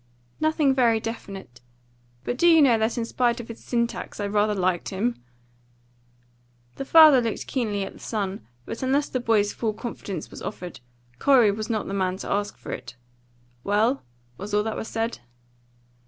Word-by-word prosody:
"Nothing 310 Hz, -3 st, +2 dB
very 235 Hz, -4 st, +3 dB
definite. 195 Hz, -, -7 dB, 0.6 s
But 245 Hz, -, -2 dB
do 340 Hz, +7 st, +3 dB
you 330 Hz, -1 st, +7 dB
know 270 Hz, -6 st, +6 dB
that 220 Hz, +3 st, 0 dB
in 235 Hz, -, -1 dB
spite 240 Hz, 0 st, 0 dB
of 235 Hz, -, -8 dB
his 230 Hz, -, -9 dB
syntax 235 Hz, -2 st, -2 dB
I 205 Hz, -, -1 dB
rather 210 Hz, +1 st, +1 dB
liked 185 Hz, -2 st, 0 dB
him?" 200 Hz, -, -2 dB, 1.5 s
The 275 Hz, -, -4 dB
father 310 Hz, -4 st, +8 dB
looked 230 Hz, -2 st, -3 dB
keenly 215 Hz, -6 st, -1 dB
at -, -, -7 dB
the -, -, -15 dB
son; 200 Hz, -, -4 dB, 0.2 s
but -, -, -6 dB
unless 275 Hz, +3 st, +1 dB
the 255 Hz, -, -1 dB
boy's 220 Hz, -4 st, +2 dB
full 220 Hz, -2 st, -2 dB
confidence 205 Hz, -7 st, -6 dB
was -, -, -10 dB
offered, 175 Hz, -6 st, -6 dB, 0.4 s
Corey 250 Hz, -7 st, +5 dB
was 215 Hz, +2 st, -5 dB
not 220 Hz, -2 st, -1 dB
the 195 Hz, -, -4 dB
man 185 Hz, -1 st, 0 dB
to -, -, -6 dB
ask 205 Hz, 0 st, -1 dB
it. -, -, -6 dB, 0.7 s
"Well?" 220 Hz, +6 st, +2 dB, 0.4 s
was 205 Hz, +1 st, -3 dB
all 210 Hz, -, +3 dB
that 220 Hz, 0 st, -3 dB
he -, -, -3 dB
said. 225 Hz, +1 st, -3 dB
225 Hz, 170 wpm, -25 LUFS, 205-245 Hz, 1.5 s, father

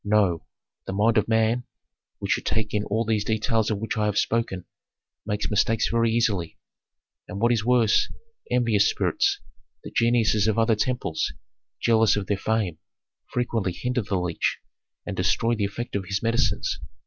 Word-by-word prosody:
"No. 100 Hz, -5 st, +1 dB, 0.4 s
The -, -, -3 dB
mind 110 Hz, +3 st, +3 dB
of -, -, -2 dB
man, 115 Hz, +2 st, +2 dB, 0.5 s
which -, -, -3 dB
should -, -, 0 dB
take 110 Hz, -1 st, -1 dB
in 105 Hz, -1 st, +1 dB
all 110 Hz, +3 st, 0 dB
these 110 Hz, -2 st, +1 dB
details 110 Hz, +1 st, 0 dB
of 110 Hz, -, 0 dB
which 110 Hz, +2 st, -3 dB
I 105 Hz, -, +1 dB
have 105 Hz, -1 st, -1 dB
spoken, 110 Hz, -6 st, 0 dB, 0.6 s
makes 105 Hz, +1 st, -2 dB
mistakes 105 Hz, +1 st, +2 dB
very 115 Hz, 0 st, +2 dB
easily. 105 Hz, -8 st, 0 dB, 0.7 s
And 100 Hz, -, -6 dB
what 120 Hz, +2 st, +3 dB
is 115 Hz, -3 st, +1 dB
worse, 120 Hz, -3 st, +3 dB, 0.4 s
envious 115 Hz, -5 st, +3 dB
spirits, -, -, +1 dB, 0.4 s
the -, -, -8 dB
geniuses 115 Hz, -3 st, +2 dB
of 110 Hz, -, +1 dB
other 115 Hz, 0 st, +3 dB
temples, 105 Hz, -7 st, -1 dB, 0.5 s
jealous 110 Hz, -2 st, +4 dB
of 105 Hz, -1 st, -2 dB
their 100 Hz, 0 st, 0 dB
fame, 105 Hz, -7 st, -1 dB, 0.5 s
frequently 115 Hz, -6 st, -1 dB
hinder 125 Hz, +6 st, -1 dB
the 100 Hz, -2 st, -2 dB
leech 90 Hz, -2 st, -1 dB, 0.5 s
and -, -, -4 dB
destroy 115 Hz, +1 st, +1 dB
the 105 Hz, -3 st, 0 dB
effect 120 Hz, +4 st, -5 dB
of 100 Hz, -2 st, -2 dB
his 100 Hz, +1 st, -2 dB
medicines. 115 Hz, +1 st, 0 dB
110 Hz, 165 wpm, -25 LUFS, 100-115 Hz, 0.7 s, jealous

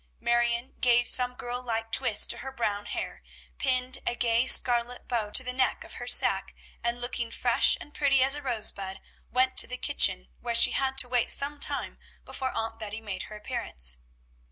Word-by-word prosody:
Marion 235 Hz, +1 st, 0 dB
gave 245 Hz, -1 st, +3 dB
some 250 Hz, -1 st, +3 dB
girl 245 Hz, 0 st, -6 dB
like 225 Hz, -2 st, -4 dB
twists -, -, +3 dB
to -, -, -3 dB
her 265 Hz, -, -7 dB
brown 205 Hz, -5 st, -3 dB
hair, -, -, -6 dB, 0.4 s
pinned 255 Hz, -1 st, +1 dB
a 240 Hz, -, 0 dB
gay 235 Hz, +1 st, +1 dB
scarlet 245 Hz, -1 st, +2 dB
bow 230 Hz, -4 st, -2 dB
to 260 Hz, -, +4 dB
the 250 Hz, 0 st, -4 dB
neck 255 Hz, 0 st, -1 dB
of -, -, -12 dB
her -, -, -7 dB
sack, -, -, +2 dB, 0.3 s
and, 235 Hz, 0 st, -2 dB
looking 245 Hz, -1 st, -3 dB
fresh -, -, +3 dB
and 295 Hz, -, -13 dB
pretty 275 Hz, -3 st, +2 dB
as 270 Hz, +1 st, +4 dB
a 295 Hz, -, 0 dB
rosebud, 210 Hz, -6 st, -2 dB, 0.3 s
went 255 Hz, +1 st, 0 dB
to -, -, +9 dB
the 250 Hz, -, -6 dB
kitchen, -, -, +1 dB
where 235 Hz, -, -4 dB
she -, -, +6 dB
had 265 Hz, 0 st, -2 dB
to 250 Hz, -, +3 dB
wait 245 Hz, -1 st, 0 dB
some 285 Hz, +1 st, +3 dB
time -, -, -2 dB, 0.3 s
before 260 Hz, -1 st, -4 dB
Aunt 225 Hz, 0 st, -4 dB
Betty 215 Hz, 0 st, -6 dB
made 205 Hz, -4 st, -7 dB
her 215 Hz, -, -9 dB
appearance. 60 Hz, -, -6 dB
240 Hz, 190 wpm, -27 LUFS, 225-255 Hz, 0.4 s, to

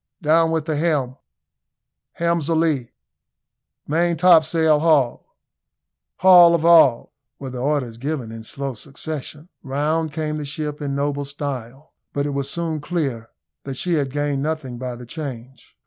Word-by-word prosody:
"Down 165 Hz, +2 st, +4 dB
with 160 Hz, -2 st, -1 dB
the 160 Hz, -2 st, -1 dB
helm!" 145 Hz, -5 st, 0 dB, 1.0 s
"Helm's 170 Hz, -2 st, 0 dB
a 165 Hz, -, +2 dB
lee!" 155 Hz, -7 st, 0 dB, 1.0 s
"Maintopsail 160 Hz, -1 st, +4 dB
haul!" 150 Hz, -6 st, +1 dB, 0.8 s
"Haul 175 Hz, -2 st, +7 dB
of 165 Hz, -1 st, -1 dB
all!" 160 Hz, -8 st, +5 dB, 0.2 s
were 135 Hz, -2 st, -7 dB
the 125 Hz, -, -6 dB
orders 130 Hz, -4 st, -1 dB
given 135 Hz, -4 st, -4 dB
in 115 Hz, 0 st, -8 dB
slow 135 Hz, +4 st, -5 dB
succession. 150 Hz, +5 st, -7 dB
Round 150 Hz, +4 st, -1 dB
came 155 Hz, 0 st, -3 dB
the 150 Hz, -, -5 dB
ship 150 Hz, +1 st, -5 dB
in 140 Hz, -1 st, -3 dB
noble 145 Hz, 0 st, -1 dB
style, 140 Hz, 0 st, -7 dB, 0.2 s
but 140 Hz, 0 st, -1 dB
it 145 Hz, -, -2 dB
was 140 Hz, 0 st, -3 dB
soon 165 Hz, 0 st, -3 dB
clear 140 Hz, -9 st, -3 dB, 0.3 s
that 135 Hz, -1 st, -6 dB
she 175 Hz, +4 st, -1 dB
had 145 Hz, -4 st, 0 dB
gained 145 Hz, -1 st, -1 dB
nothing 145 Hz, -5 st, -4 dB
by 125 Hz, -1 st, -5 dB
the 120 Hz, +1 st, -10 dB
change. 130 Hz, -2 st, -9 dB
145 Hz, 150 wpm, -21 LUFS, 135-160 Hz, 1.0 s, Haul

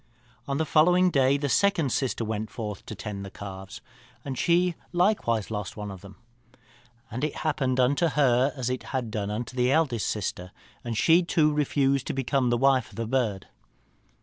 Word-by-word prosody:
"On 140 Hz, 0 st, -1 dB
the 160 Hz, -, 0 dB
following 180 Hz, +4 st, +4 dB
day 135 Hz, -2 st, +3 dB
the 145 Hz, 0 st, -2 dB
second 165 Hz, -3 st, +2 dB
sister 125 Hz, -3 st, -1 dB
went 110 Hz, 0 st, -3 dB
forth 105 Hz, -4 st, -6 dB
to 110 Hz, -, -6 dB
tend 100 Hz, -1 st, -6 dB
the 100 Hz, -, -7 dB
calves, 95 Hz, +1 st, -9 dB, 0.4 s
and 135 Hz, -2 st, -4 dB
she 175 Hz, +5 st, +2 dB, 0.2 s
likewise 175 Hz, -, +1 dB
lost 105 Hz, -1 st, -4 dB
one 105 Hz, -1 st, -5 dB
of 95 Hz, -2 st, -10 dB
them. 100 Hz, 0 st, -12 dB, 1.0 s
And 125 Hz, +5 st, -4 dB
it 150 Hz, -, -1 dB
happened 130 Hz, -4 st, 0 dB
unto 140 Hz, +7 st, +3 dB
her 135 Hz, -3 st, +3 dB
as 125 Hz, -2 st, -2 dB
it 130 Hz, -, -3 dB, 0.2 s
had 120 Hz, -4 st, -4 dB
done 105 Hz, -2 st, -3 dB
unto 115 Hz, +4 st, -4 dB
the 125 Hz, 0 st, +2 dB
eldest 135 Hz, -8 st, +1 dB
sister, 90 Hz, -3 st, -3 dB, 0.3 s
and 115 Hz, -3 st, -3 dB
she 165 Hz, +8 st, +5 dB
too 160 Hz, -3 st, +2 dB
refused 140 Hz, -2 st, +1 dB
to -, -, -2 dB
become 135 Hz, -1 st, 0 dB
the 120 Hz, -, +2 dB
wife 130 Hz, -1 st, +3 dB
of -, -, -16 dB
the 115 Hz, -, -3 dB
bird. 110 Hz, -5 st, -1 dB
130 Hz, 185 wpm, -26 LUFS, 110-145 Hz, 1.0 s, she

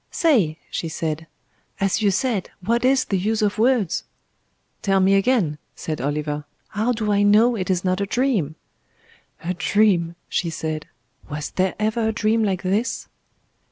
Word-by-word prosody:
"Say!" 220 Hz, -, +2 dB
she 165 Hz, -, -2 dB
said. 160 Hz, 0 st, -3 dB, 0.5 s
"As 195 Hz, +2 st, +1 dB
you 205 Hz, -, +4 dB
said, 210 Hz, -1 st, 0 dB, 0.2 s
What 235 Hz, +4 st, +1 dB
is 260 Hz, +1 st, +3 dB
the 195 Hz, -, 0 dB
use 215 Hz, +3 st, 0 dB
of 210 Hz, 0 st, 0 dB
words?" 230 Hz, -7 st, +2 dB, 0.8 s
"Tell 195 Hz, -2 st, +2 dB
me 190 Hz, +1 st, +4 dB
again," 195 Hz, -, +2 dB, 0.2 s
said 155 Hz, -5 st, -4 dB
Oliver. 150 Hz, +1 st, -2 dB, 0.3 s
"How 220 Hz, +4 st, 0 dB
do 220 Hz, -3 st, -1 dB
I 200 Hz, 0 st, +3 dB
know 215 Hz, +4 st, +5 dB
it 190 Hz, -4 st, -3 dB
is 185 Hz, 0 st, 0 dB
not 185 Hz, +1 st, +1 dB
a 200 Hz, -, -1 dB
dream?" 220 Hz, -, 0 dB, 0.9 s
"A 175 Hz, +2 st, -1 dB
dream," 180 Hz, -3 st, +2 dB
she 170 Hz, -, -1 dB
said. 155 Hz, -1 st, -4 dB, 0.4 s
"Was 150 Hz, 0 st, -4 dB
there 185 Hz, 0 st, 0 dB
ever 220 Hz, +1 st, 0 dB
a 220 Hz, -, 0 dB
dream 220 Hz, +1 st, +2 dB
like 195 Hz, -3 st, -1 dB
this?" 200 Hz, +6 st, -1 dB
195 Hz, 160 wpm, -22 LUFS, 170-220 Hz, 0.9 s, know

